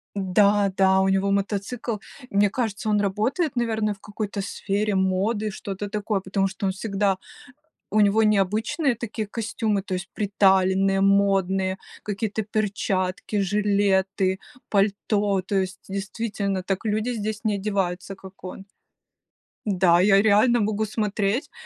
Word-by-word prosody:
Да-да, 195 -1 +3
у 190 - +2
него 195 +1 +2
мотоцикл. 205 +4 -2 0.3
Мне 200 0 +3
кажется, 220 -2 -2
он 210 -1 +3
работает, 230 - 0
наверное, 220 -3 0
в 195 - -19
какой-то 205 -1 -4
сфере 205 +1 -2
моды, 200 +3 0
что-то 200 +1 -6
такое, 210 -1 -1
потому 195 +1 0
что 190 +1 -5
он 190 - +1
всегда 195 -1 0 0.7
у 215 - +3
него 210 +2 +4
необычные 215 - +1
такие 220 -1 -5
костюмы, 215 -1 -1
то 185 -1 -4
есть 185 +1 -5
приталенные, 195 -1 +3
модные, 195 -1 +2 0.2
какие-то 210 +1 -2
перчатки, 200 -2 -2
жилеты, 195 -1 +1 0.3
пальто, 200 0 +1
то 195 +3 -5
есть 190 -2 -1
действительно 200 -1 -3
так 195 +3 -3
люди 215 +2 0
здесь 215 -2 -3
не 215 - +1
одеваются, 195 -2 -2
как 190 0 -14
он. 195 +2 -8 1.0
Да, 180 -3 +4
я 195 +1 +5
реально 220 +3 +4
могу 215 0 0
смотреть 210 +2 -1
200 Hz, 130 wpm, -24 LUFS, 195-215 Hz, 1.0 s, я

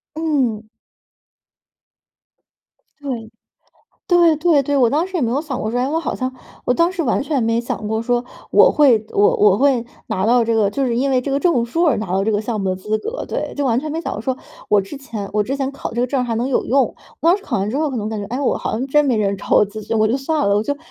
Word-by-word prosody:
嗯。 275 -9 0 2.4
对。 240 -5 -5 0.7
对 345 -3 +4
对 310 -2 +3
对， 285 +1 -1
我 250 -4 +4
当 315 +8 0
时 380 - -8
也 335 - 0
没 235 -1 0
有 280 - 0
想 295 -5 -5
过 215 - -2
说： 245 - -1
“诶， 255 - +1
我 320 - 0
好 330 - -2
像 255 0 -4 0.3
“我 250 - +4
当 335 +4 +2
时 370 -2 -3
完 270 -2 0
全 285 -4 -1
没 230 +1 +1
想 215 -2 -4
过 220 +1 -1
说 240 +1 0 0.3
我 - - +7
会 260 -8 +4
我 205 - +3
我 205 -1 +5
会 260 -3 +2 0.2
拿 190 - -1
到 240 +1 +4
这 230 0 0
个 215 -3 +2
就 270 +6 -1
是 235 -1 0
因 275 +2 +1
为 255 -1 +2
这 275 - -4
个 275 - +1
证 285 -9 +2
书 330 +9 0
而 295 - +3
拿 215 - -4
到 190 +1 +1
这 220 - 0
个 205 - 0
项 220 -1 -3
目 190 -1 -1
的 185 - 0
资 210 +4 -2
格， 460 - -5
对。 - - -4
就 285 - -1
完 240 -2 +2
全 305 +3 -5
没 325 +2 -3
想 - - -4
过 210 - -5
说 260 +2 -2 0.3
我 205 -1 +4
之 195 +9 -9
前 225 -7 -6
我 210 - +1
之 255 +7 -2
前 275 -1 -2
考 275 - -6
的 - - -10
这 240 - 0
个 - - +2
证 260 +1 -1
儿 - - 0
还 230 -2 -2
能 245 +4 -1
有 - - 0
用， 270 +1 +3
我 - - -6 0.3
当 345 +4 +4
时 400 - -17
考 - - -2
完 195 +2 -1
之 260 - -2
后 305 0 0
可 265 - -5
能 215 -1 -3
感 220 -2 -4
觉： 200 - -6
“诶， 250 +5 -3
我 275 - +1
好 - - -4
像 245 +4 -1
真 295 +2 +3
没 260 -4 +2
人 200 -2 0
找 - - -10
我 - - +6
咨 215 +2 -8
询， 225 - 0
我 215 - +3
就 230 +5 +1
算 295 -2 0
了， 200 - +3
我 - - +1
就 285 +5 -2
250 Hz, 305 characters per minute, -19 LUFS, 220-285 Hz, 2.4 s, 我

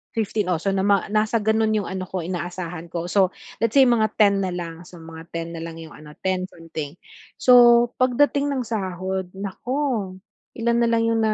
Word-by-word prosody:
15 210 -2 -1
oh, 165 - +1
so 195 +2 -1
nama 195 0 +2
nasa 215 +1 +2
gano'n 220 +1 +2
'yong 210 - -1
ano 185 0 -4
ko 185 -1 -4
inaasahan 175 -1 -5
ko, 170 0 -3
so 190 -2 +3 0.3
let's 230 0 0
say 275 - +8
mga 230 -3 +3
10 200 -2 +5
na 185 - -2
lang, 170 -1 -6
so 175 - -13
mga 160 0 -10
10 165 0 -3
na 165 - -6
lang 165 0 -8
'yong 160 -2 -11
ano, 150 0 -13
10 185 -1 0
something. 160 -4 -8 0.4
So 240 -1 +7
pagdating 280 +3 +2
ng 265 -2 -1
sahod 190 -3 -3
naku, 210 +1 -3 0.4
ilan 235 0 +1
na 235 - +3
lang 230 0 +2
'yong 225 0 +1
na 215 -1 +2
195 Hz, 195 wpm, -23 LUFS, 175-230 Hz, 0.4 s, say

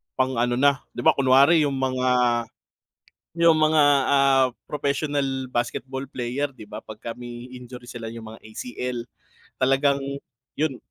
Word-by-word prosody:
pang-ano 120 -2 +1
na. 140 +2 +3 0.2
Di - - -4
ba, 160 - +7
kunwari 140 +3 +5
yung 140 - -2
mga 130 -1 -1 1.3
yung 170 -1 +6
mga, 155 0 +4 0.3
ah, 135 -2 +4 0.2
professional 140 -2 -1
basketball 130 +2 -3
player, 130 +3 -2
'di 130 -5 -13
ba, 105 +1 -8
pagka 110 +2 -8
may 120 +1 -9
injury 125 0 -10
sila, 120 -2 -7
yung 115 0 -9
mga 110 - -14
ACL, 120 +2 -5 0.5
talagang 135 +2 +3 0.6
yun, 145 -4 -1
130 Hz, 130 wpm, -24 LUFS, 120-140 Hz, 1.3 s, ba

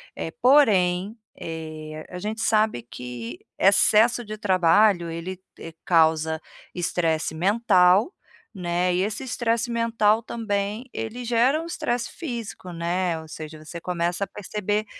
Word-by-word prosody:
eh, - - -4
porém, 205 -7 +4 0.2
eh, 155 -1 -7
a 180 - -6
gente 215 +3 -4
sabe 215 - +2
que 120 -1 -8 0.2
excesso 220 +5 +4
de 215 -1 -7
trabalho, 185 -2 +3
ele 170 +3 -6 0.5
causa 160 -2 +3 0.3
estresse 165 -3 -1
mental, 190 - +3 0.5
né, 180 0 0
e 180 - +1
esse 210 +3 -3
estresse 235 -1 -1
mental 230 -2 +2
também 215 +1 -3
ele 235 +2 -5
gera 245 +6 +2
o 330 - -7
estresse 275 -8 -2
físico, 235 - -6
né, 170 0 -1
ou 160 - -11
seja, 155 0 -9
você 170 +2 -8
começa 175 +1 -1
a - - -2
perceber 210 +1 -3
190 Hz, 130 wpm, -24 LUFS, 170-225 Hz, 0.5 s, porém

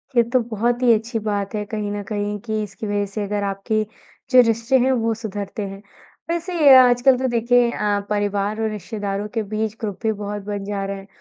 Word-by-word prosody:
ये 235 - +6
तो 255 - +5
बहुत 240 +3 0
ही 235 -2 +6
अच्छी 225 +1 -1
बात 205 -1 -2
है 210 - -1
कहीं 210 -1 -4
न 205 0 -3
कहीं 205 0 -2
कि 215 0 -3
इसकी 205 +1 -7
वज़ह 205 0 0
से 210 - -2
अगर 205 0 -2
आपकी 200 +2 -1 0.5
जो 255 - +9
रिश्ते 230 +4 +2
हैं 260 +2 +3
वो 230 -3 +1
सुधरते 210 -1 -5
हैं। 195 +1 -9 0.5
वैसे 335 -4 +4
आजकल 250 +1 +5
तो 260 0 0
देखिए 240 0 +3
अ, 205 -2 0
परिवार 205 +1 -1
और 220 - 0
रिश्तेदारों 205 0 -4
के 225 -2 -1
बीच 215 +1 -3
ग्रुप 205 -3 -3
भी 220 - +2
बहुत 205 0 -5
बन 205 -1 -4
जा 200 -1 -3
रहे 195 0 -4
हैं। 195 0 -12
215 Hz, 210 wpm, -21 LUFS, 205-235 Hz, 0.5 s, जो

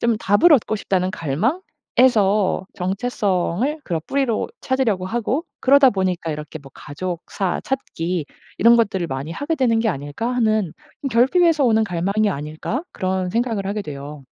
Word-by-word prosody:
좀 235 -1 +2
답을 205 - +4
얻고 225 -5 +3
싶다는 185 -2 -1
갈망에서 205 - +1
정체성을 200 - -1
그런 165 -3 -2
뿌리로 270 -5 0
찾으려고 230 -9 0
하고 240 - -1 0.2
그러다 275 +1 +6
보니까 185 -5 -1
이렇게 150 +1 -6
뭐 140 -2 -15
'가족사 180 +4 -4
찾기 175 - -3 0.3
이런 235 +1 +6
것들을 195 -6 +1
많이 140 +2 -5
하게 290 - -2
되는 250 -6 +2
게 225 0 +1
아닐까?' 145 - -3
하는 220 -7 +1 0.3
음 275 - +1
'결핍에서 295 +6 +3
오는 220 -2 +3
갈망이 200 +4 0
아닐까?' 155 - -4
그런 185 -1 -2
생각을 225 -2 -1
하게 205 +2 -2
돼요. 145 -2 -8
205 Hz, 340 characters per minute, -21 LUFS, 175-245 Hz, 0.3 s, 그러다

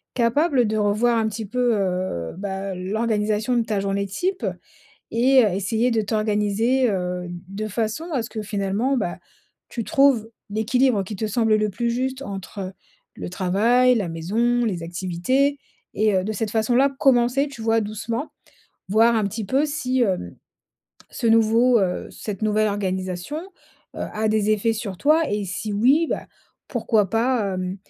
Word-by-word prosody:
capable 250 +2 +2
de 215 +1 -1
revoir 215 +3 +2
un 220 -1 +1
petit 215 +1 -5
peu, 245 +2 +1
heu, 185 - -2
bah, 195 0 -4
l'organisation 215 +4 0
de 235 - +2
ta 210 -3 -1
journée 200 0 -1
type? 370 - -2 0.7
Et 255 +2 +5
heu, 205 - +1
essayer 220 +5 0
de 225 -1 +1
t'organiser, 215 +4 +1
heu, 180 -2 -2
d 175 - -6 0.3
de - - -3
façon 220 - -2
à 260 -5 0
ce 225 - -8
que 215 - -5
finalement, 210 +6 -1
bah, 175 -7 -2 0.5
tu 230 - -4
trouves 270 -5 +3 0.2
l'équilibre 220 +1 +2
qui 205 +2 -6
te 220 - -2
semble 220 +1 +2
le 215 0 0
plus 235 +5 -2
juste 260 +2 -2
entre 195 -2 -6 0.4
le - - -6
travail, 225 +8 +3
la 200 -6 -1
maison, 230 +9 0
les 180 -6 -2
activités 185 +12 0 0.4
et 215 0 +2
heu, 185 - +1
de 220 - -2
cette 215 +1 -2
façon 225 +2 +1
là, 275 +2 +4
commencer, 260 +2 +3
tu 255 -5 -9
vois 225 0 +2
doucement. 225 +6 -4 0.6
Voir 225 +3 +4
un 220 - +2
petit 215 +2 -4
peu 270 +8 +2
si, 270 -4 -1
hem, 185 - -1 0.8
ce - - -3
nouveau 230 +2 +4
heu, 180 -2 -1
cette 205 -3 -6
nouvelle 215 0 +2
organisation, 190 +3 -3 0.6
heu, - - -6
a 215 +1 0
des 215 -1 +1
effets 215 +2 +2
sur 205 -4 -5
toi 310 +3 +4
et 205 0 -1
si 195 +3 -4
oui, 270 +10 +4
bah, - - -3 0.4
pourquoi 210 -5 +1
pas, 225 -3 +1
hem, 185 0 -3
220 Hz, 170 wpm, -23 LUFS, 200-240 Hz, 0.8 s, Et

